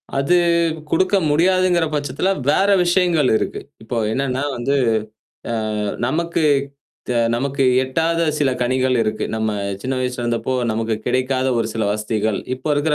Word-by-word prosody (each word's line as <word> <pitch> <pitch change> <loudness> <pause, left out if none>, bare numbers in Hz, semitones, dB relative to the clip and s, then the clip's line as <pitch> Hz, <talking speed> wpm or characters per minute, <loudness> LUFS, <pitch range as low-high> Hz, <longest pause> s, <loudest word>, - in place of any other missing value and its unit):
அது 140 +6 +2 0.5
குடுக்க 185 +4 +2
முடியாதுங்கிற 175 +2 +3
பட்சத்தில 145 +4 -1 0.2
வேற 195 +6 +3 0.2
விஷயங்கள் 175 -5 +2
இருக்கு. - - -4 0.2
இப்போ 115 +2 -4
என்னன்னா 135 +2 -1
வந்து 135 +4 0 0.8
அ - - -1 0.5
நமக்கு 165 +4 -1 0.7
த - - 0 0.2
நமக்கு 135 +2 0 0.2
எட்டாத 165 +5 0 0.2
சில 140 -3 +2
கனிகள் 130 +1 +1
இருக்கு. 110 0 -2
நம்ம 110 0 -1 0.3
சின்ன 130 +1 -2
வயசுல 125 -1 -2
இருந்தப்போ 120 +2 -1 0.2
நமக்கு 110 0 -1
கிடைக்காத 130 +1 0
ஒரு 115 - 0
சில 110 -1 -1
வசதிகள், 110 -1 -1 0.2
இப்போ 130 - -6
இருக்கிற 150 +1 +1
135 Hz, 135 wpm, -20 LUFS, 120-165 Hz, 0.8 s, முடியாதுங்கிற